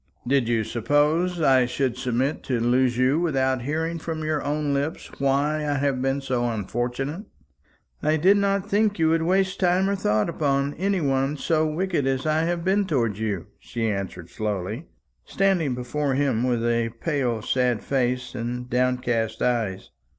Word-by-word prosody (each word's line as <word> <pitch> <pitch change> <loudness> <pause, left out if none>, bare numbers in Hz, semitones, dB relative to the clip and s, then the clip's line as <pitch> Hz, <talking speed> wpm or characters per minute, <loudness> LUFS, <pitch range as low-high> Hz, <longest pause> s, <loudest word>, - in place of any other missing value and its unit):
Did 130 -1 +2
you 115 -2 +2
suppose 145 +10 +1
I 130 -4 +4
should 125 -1 -1
submit 130 +3 -1
to 125 -3 0
lose 120 +1 +2
you 130 +5 +3
without 130 -6 +1
hearing 160 +5 -2
from 160 0 -4
your 155 -1 -1
own 145 0 -1
lips 140 +3 -3
why 140 +3 +1
I 150 -1 -1
have 135 -2 0
been 135 +1 0
so 125 -3 -1
unfortunate?" 125 - -3 0.8
"I 155 +1 +2
did 190 +6 +5
not 200 0 +1
think 205 0 +2
you 160 -1 +3
would 165 0 +2
waste 185 +2 +1
time 185 +1 +3
or 200 - +1
thought 105 - +1
upon 140 -3 0
any 195 +1 0
one 135 0 0
so 155 +1 +1
wicked 165 -2 -1
as 135 +1 -1
I 155 +1 +2
have 170 0 -2
been 195 +1 +2
towards 115 - 0
you," 105 -6 -2
she 115 -1 -3
answered 95 -4 -4
slowly, 105 - -3 0.4
standing 180 -9 +1
before 135 +3 -2
him 130 -4 +1
with 120 -2 0
a 115 -1 +1
pale 120 -2 -2
sad 125 -3 +1
face 125 -1 -1
and 125 0 -4
downcast 125 -3 0
eyes. 110 -6 -1
135 Hz, 165 wpm, -24 LUFS, 120-160 Hz, 0.8 s, did